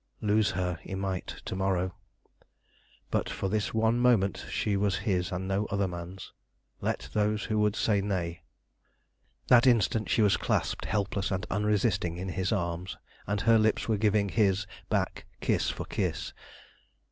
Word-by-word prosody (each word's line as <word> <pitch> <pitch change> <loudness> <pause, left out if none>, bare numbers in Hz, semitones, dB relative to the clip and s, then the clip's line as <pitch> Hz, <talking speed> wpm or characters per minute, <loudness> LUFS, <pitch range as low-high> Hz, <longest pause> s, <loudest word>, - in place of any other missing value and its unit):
Lose 105 -1 +3
her 90 -1 -2
he 95 - -6
might 95 -1 -3 0.2
to - - -4
morrow, 95 -1 0 1.2
but - - 0
for 95 - -2
this 105 +1 0
one 110 +1 +2
moment 115 -6 +2
she 105 - 0
was 100 -1 +1
his 90 -3 0
and 95 +1 -3
no 95 +2 0
other 100 -1 0
man's, 90 +1 -8 0.5
let - - -2
those 105 -1 +1
who 110 -1 0
would 105 0 +2
say 105 -3 +2
nay. 90 -4 -2 1.1
That 125 0 +6
instant 115 -2 +3
she 110 - +3
was 100 - +4
clasped - - -1
helpless 100 -2 -1
and 95 +1 -2
unresisting 100 -4 +1
in 95 +1 -4
his 95 +2 -1
arms, 85 -2 -2 0.3
and 100 +1 0
her 115 -1 +5
lips 110 0 +1
were 110 -2 +2
giving 105 -1 +2
his 100 +2 +2 0.2
back - - -1
kiss - - +1
for - - -4
kiss. - - -2
100 Hz, 160 wpm, -29 LUFS, 95-105 Hz, 1.2 s, That